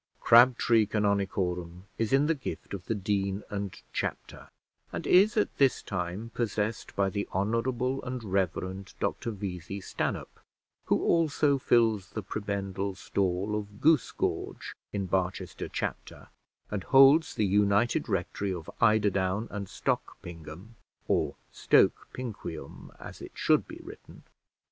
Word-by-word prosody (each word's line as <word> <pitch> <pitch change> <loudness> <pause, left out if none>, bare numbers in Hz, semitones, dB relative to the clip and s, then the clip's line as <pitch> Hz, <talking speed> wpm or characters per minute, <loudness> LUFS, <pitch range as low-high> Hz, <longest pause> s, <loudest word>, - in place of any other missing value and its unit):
Crabtree 120 -2 +5
Canonicorum 95 -4 -1 0.2
is 115 -1 0
in 135 +2 +4
the 165 - +3
gift 135 -7 -7
of 95 -3 -6
the 115 - 0
dean 100 0 -1
and 100 -2 -4
chapter, - - -4 0.4
and - - -5
is 205 +6 +5
at 210 - +1
this 135 -2 +3
time 95 +4 -4
possessed 110 -1 -2
by 100 -1 +2
the 100 +1 -3
Honourable 120 +6 0
and 125 -1 -5
Reverend 95 -1 -2
Dr - - -2
Vesey 95 -3 -5
Stanhope, 95 - -4 0.5
who - - +1
also 150 -4 +2
fills 110 -6 +2
the 110 - -4
prebendal 100 -1 -3
stall 95 +1 -1
of 105 -1 -6
Goosegorge 155 -3 0 0.2
in 100 -2 -2
Barchester 95 0 -2
Chapter, - - -5 0.4
and 100 -3 -2
holds 135 +4 +6
the 105 - +1
united 100 +3 +2
rectory 100 -1 -1
of 85 -3 -6
Eiderdown 105 -2 +2
and 100 -1 -4
Stogpingum, 85 +9 -5 0.3
or - - +1 0.2
Stoke - - +3
Pinquium, 105 - -7
as - - -10
it - - -9
should - - +2
be - - -9
written. - - -13
100 Hz, 130 wpm, -29 LUFS, 95-115 Hz, 0.5 s, holds